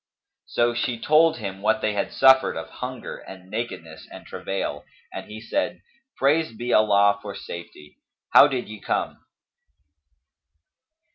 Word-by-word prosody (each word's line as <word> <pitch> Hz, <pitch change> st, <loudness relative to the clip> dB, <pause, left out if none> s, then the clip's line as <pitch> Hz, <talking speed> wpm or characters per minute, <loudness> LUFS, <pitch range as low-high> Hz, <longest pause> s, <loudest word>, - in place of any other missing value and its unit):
So 120 Hz, 0 st, +1 dB
she 120 Hz, 0 st, -2 dB
told 160 Hz, +4 st, +4 dB
him 95 Hz, -3 st, -6 dB
what 110 Hz, +6 st, +2 dB
they 110 Hz, -, 0 dB
had 100 Hz, -1 st, -2 dB
suffered 130 Hz, 0 st, +5 dB
of -, -, -7 dB
hunger -, -, -6 dB
and 95 Hz, -1 st, -13 dB
nakedness 90 Hz, -9 st, -6 dB
and -, -, -11 dB
travail, 75 Hz, -6 st, -4 dB, 0.3 s
and -, -, -7 dB
he 110 Hz, +1 st, -8 dB
said, 115 Hz, -, -3 dB, 0.3 s
"Praised 145 Hz, -3 st, +1 dB
be 120 Hz, +1 st, -2 dB
Allah 100 Hz, -1 st, +4 dB
for 100 Hz, -1 st, -7 dB
safety! 85 Hz, -5 st, -10 dB, 0.3 s
How -, -, +9 dB
did 130 Hz, -4 st, -3 dB
ye 110 Hz, 0 st, -9 dB
come?" -, -, -2 dB
110 Hz, 140 wpm, -24 LUFS, 95-130 Hz, 0.3 s, How